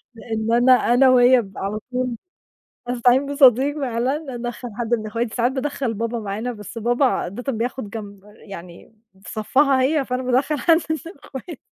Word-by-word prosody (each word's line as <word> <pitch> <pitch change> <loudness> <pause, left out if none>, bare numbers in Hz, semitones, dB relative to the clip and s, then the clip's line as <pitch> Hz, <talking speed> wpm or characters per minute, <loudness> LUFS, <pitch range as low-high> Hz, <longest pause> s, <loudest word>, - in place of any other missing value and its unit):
لأن 225 0 -3
أنا 245 +2 +5 0.2
أنا 260 +1 +5
وهي 250 0 +6
بنبقى 195 -3 -9
على 210 +2 -3
طول 250 -1 -2 0.7
أستعين 245 +2 +3
بصديق 280 0 +4
فعلًا، 265 +3 -2
أدَخّل 240 +1 -6
حد 240 0 -2
من 215 -2 -1
اخواتي، 230 +1 -3
ساعات 245 +1 +1
بادَخّل 265 -3 -2
بابا 230 +2 -3
معانا، 215 +4 -4
بس 210 0 -10
بابا 240 +4 +1
عادةً 245 +3 -2
بياخد 230 -1 -4
جمب 205 -3 -8 0.2
يعني 180 0 -12 0.3
في 180 - -9
صفّها 265 +5 +2
هي، 280 +1 +1
فأنا 255 +1 -3
بادَخّل 260 +4 +1
حدّ 330 -2 +4
من 315 +3 -4
أخواتي. 280 +3 -9
245 Hz, 165 wpm, -21 LUFS, 225-265 Hz, 0.7 s, وهي